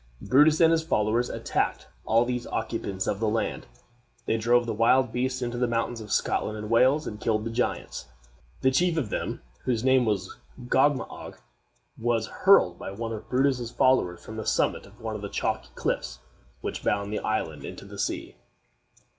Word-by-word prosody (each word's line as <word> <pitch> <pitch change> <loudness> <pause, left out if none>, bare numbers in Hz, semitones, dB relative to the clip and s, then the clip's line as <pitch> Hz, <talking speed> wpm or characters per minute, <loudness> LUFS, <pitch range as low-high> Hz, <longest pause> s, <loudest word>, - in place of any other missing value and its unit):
Brutus 150 +4 +4
and 165 -1 +6
his 165 -1 +3
followers 115 -4 +1
attacked - - -2 0.2
all 115 +2 +3
these 125 -1 -3
occupants 110 -4 -3
of 100 - -1
the 110 -1 +1
land. 110 +1 -2 0.6
They - - +1
drove 120 +2 +3
the 115 - -2
wild 120 +3 +3
beasts 130 +1 -1
into 120 0 -3
the 125 - +2
mountains 115 0 -1
of 105 -2 -9
Scotland 110 0 0
and 105 +1 -6
Wales, 130 +6 +4
and 105 0 -6
killed 110 -1 +1
the 115 - -3
giants. 120 +2 -2 0.5
The 130 - +4
chief 170 +5 +2
of 125 -10 -1
them, - - -3 0.2
whose 120 -3 0
name 130 -1 +4
was 100 -4 -2 0.3
Gogmagog, 130 +2 0 0.6
was 115 -1 +1
hurled 145 - +4
by - - -6
one 115 +4 -4
of 110 - -8
Brutus's 130 -2 +1
followers 90 -10 +2
from 110 - -8
the 110 - -4
summit - - +1
of - - -19
one 110 -1 -4
of 105 - -6
the 100 - -5
chalky - - -2
cliffs - - -2 0.4
which - - -4
bound 100 +1 0
the - - -1
island 80 -9 -2
into - - -8
the - - -10
sea. - - -3
115 Hz, 180 wpm, -27 LUFS, 110-130 Hz, 0.6 s, and